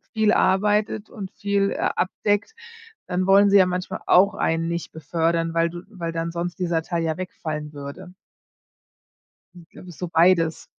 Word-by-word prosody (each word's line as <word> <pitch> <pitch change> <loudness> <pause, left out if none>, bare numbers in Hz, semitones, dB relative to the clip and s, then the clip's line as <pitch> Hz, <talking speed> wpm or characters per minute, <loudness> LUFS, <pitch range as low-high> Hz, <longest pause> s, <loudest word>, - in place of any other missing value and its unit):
viel 220 -2 +2
arbeitet 210 +2 +1
und 195 -3 -8
viel, 200 -1 0
äh, - - -4 0.2
abdeckt, 205 - -1 0.5
dann 185 0 -1
wollen 200 +1 +6
sie 200 - +5
ja 185 - +6
manchmal 180 0 -3
auch 195 +3 +5
einen 165 +1 0
nicht 170 -2 -4
befördern, 165 +2 -1
weil 165 0 +2
du 175 +1 -8
weil 170 -6 -5
dann 165 0 -3
sonst 175 +1 -4
dieser 170 -3 0
Teil 170 0 -2
ja 160 -1 -1
wegfallen 155 -4 -5
würde. 145 +6 -9 1.4
Ich 170 -2 -15
glaube, 180 - -13
ist 175 - -12
so 180 - -4
beides. 165 -1 +3
175 Hz, 165 wpm, -23 LUFS, 165-195 Hz, 1.4 s, wollen